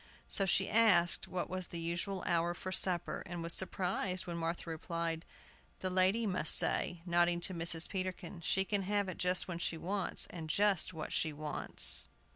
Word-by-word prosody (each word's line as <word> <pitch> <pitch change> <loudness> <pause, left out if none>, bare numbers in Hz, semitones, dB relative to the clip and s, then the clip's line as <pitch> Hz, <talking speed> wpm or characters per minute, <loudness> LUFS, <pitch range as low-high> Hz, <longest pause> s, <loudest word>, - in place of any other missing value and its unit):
So 195 - +1
she 190 +1 +3
asked 205 -7 +3
what 185 - -4
was 185 -1 -5
the 170 - -6
usual 170 +3 -3
hour 170 0 0
for 185 - -7
supper, 180 -2 +2
and 175 -2 -6
was 170 0 0
surprised 185 0 -1
when 175 - -6
Martha 165 +1 -4
replied, 165 0 -4 0.6
"The 185 - -2
lady 190 +5 +2
must 185 -6 +3
say," 175 -2 +1
nodding 175 0 +2
to 185 - 0
Mrs. 165 -1 +3
Peterkin. 185 -2 -5
"She 190 +2 +1
can 205 0 -1
have 205 +1 -1
it 185 - -7
just 180 0 +1
when 170 -2 -5
she 170 -2 -2
wants, 195 +3 -1
and 160 -3 -8
just 195 0 +2
what 160 -3 -7
she 160 - 0
wants!" 150 0 +3
175 Hz, 180 wpm, -33 LUFS, 170-190 Hz, 0.6 s, she